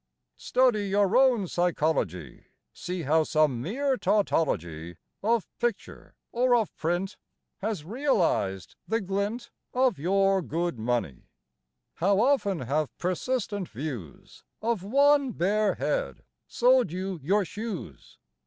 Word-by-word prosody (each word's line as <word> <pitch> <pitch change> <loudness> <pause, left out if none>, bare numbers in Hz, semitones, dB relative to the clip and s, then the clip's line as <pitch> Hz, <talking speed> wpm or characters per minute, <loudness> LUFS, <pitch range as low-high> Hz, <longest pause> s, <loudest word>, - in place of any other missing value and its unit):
Study 240 -6 +2
your 200 +1 +2
own 250 -7 +4
psychology! 150 - -1 0.3
See 180 -1 -5
how 155 +3 +3
some 150 -6 +1
mere 260 - -1
tautology 85 - 0 0.3
Of 225 0 +1
picture, 240 -4 -4 0.2
or 245 +1 +3
of 225 -4 0
print, 175 +4 -2 0.4
Has 205 -7 -3
realized 180 - 0
the 225 +1 +1
glint 200 +4 -3 0.2
Of 255 - +2
your 195 +3 +2
good 170 -4 -2
money. 115 - -2 0.7
How 195 +3 +2
often 220 - +2
have 145 +4 -2
persistent 200 +1 -2
views 120 - -8 0.2
Of 225 -3 -1
one 280 +5 +3
bare 205 +4 +1
head - - -2 0.2
sold 250 -6 +3
you 185 0 -4
your 195 +8 +2
shoes! 200 - -7
195 Hz, 115 wpm, -27 LUFS, 155-235 Hz, 0.7 s, own